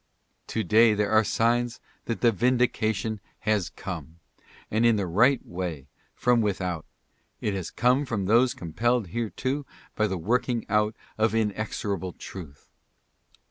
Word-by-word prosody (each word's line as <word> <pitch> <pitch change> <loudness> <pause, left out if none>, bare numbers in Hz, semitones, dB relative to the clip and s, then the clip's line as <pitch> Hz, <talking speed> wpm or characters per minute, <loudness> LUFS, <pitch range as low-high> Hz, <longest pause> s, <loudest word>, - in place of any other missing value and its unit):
To 110 - -1
day 110 +4 +5
there 105 0 0
are 110 0 +5
signs 120 +2 +1 0.3
that 115 - -3
the 120 - +5
vindication 110 -2 +1 0.2
has 105 -5 +1
come, 85 -4 -7 0.5
and 110 +2 +2
in 115 -1 +5
the 100 -2 0
right 120 +10 +3
way 85 -6 -5 0.2
— - - -39
from 125 -1 +3
without. 90 -5 -2 0.5
It 105 - -1
has 95 -3 -3
come 125 +4 +2
from 105 -5 -1
those 120 +5 +4
compelled 115 +5 0
thereto 130 +5 -2 0.3
by 110 - +2
the 95 -2 -2
working 120 +5 0
out 105 +1 +2 0.2
of 110 0 +2
inexorable 105 -4 -2
truth. 80 -8 -10
110 Hz, 140 wpm, -26 LUFS, 95-120 Hz, 0.5 s, day